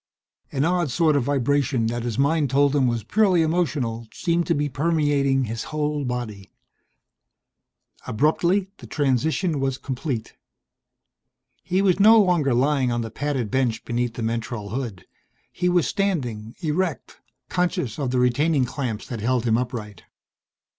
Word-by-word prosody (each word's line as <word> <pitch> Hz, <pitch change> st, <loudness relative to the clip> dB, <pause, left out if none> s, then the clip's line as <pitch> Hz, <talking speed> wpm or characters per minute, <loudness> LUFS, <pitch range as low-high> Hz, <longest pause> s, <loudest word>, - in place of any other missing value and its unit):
An 140 Hz, +2 st, 0 dB
odd 175 Hz, -2 st, +1 dB
sort 155 Hz, +4 st, +2 dB
of 135 Hz, -4 st, +1 dB
vibration 140 Hz, -2 st, +1 dB
that 120 Hz, +1 st, -2 dB
his 115 Hz, -2 st, -3 dB
mind 145 Hz, +1 st, +2 dB
told 140 Hz, +2 st, +3 dB
him 135 Hz, -3 st, +3 dB
was 120 Hz, -2 st, -1 dB
purely 185 Hz, -, +3 dB
emotional, 145 Hz, -9 st, -1 dB
seemed 170 Hz, -1 st, 0 dB
to 170 Hz, -, +2 dB
be 145 Hz, 0 st, 0 dB
permeating 145 Hz, -2 st, +1 dB
his 115 Hz, -1 st, -4 dB
whole 150 Hz, -1 st, -2 dB
body. 115 Hz, -6 st, -5 dB, 1.6 s
Abruptly 170 Hz, -, +1 dB
the -, -, -11 dB
transition 150 Hz, +4 st, 0 dB
was 135 Hz, -1 st, -1 dB
complete. 130 Hz, -4 st, -4 dB, 1.3 s
He 185 Hz, +3 st, 0 dB
was 190 Hz, -1 st, +3 dB
no 220 Hz, +3 st, +8 dB
longer 170 Hz, -, +3 dB
lying 135 Hz, 0 st, +2 dB
on 120 Hz, 0 st, -1 dB
the 115 Hz, -1 st, -5 dB
padded 135 Hz, -6 st, -2 dB
bench 125 Hz, -4 st, 0 dB
beneath 120 Hz, 0 st, -2 dB
the 115 Hz, -, -4 dB
mentrol 115 Hz, -2 st, -3 dB
hood. 115 Hz, -7 st, -5 dB, 0.5 s
He 180 Hz, -, 0 dB
was 175 Hz, -2 st, +3 dB
standing 125 Hz, -, -2 dB
erect, 165 Hz, 0 st, -2 dB, 0.3 s
conscious 175 Hz, -, -1 dB
of 135 Hz, -3 st, -1 dB
the 125 Hz, -, 0 dB
retaining 130 Hz, +3 st, +2 dB
clamps 120 Hz, -4 st, -4 dB
that 115 Hz, -4 st, -6 dB
held 125 Hz, +1 st, 0 dB
him 115 Hz, -2 st, +3 dB
upright. 115 Hz, -5 st, -4 dB
135 Hz, 145 wpm, -23 LUFS, 120-160 Hz, 1.6 s, no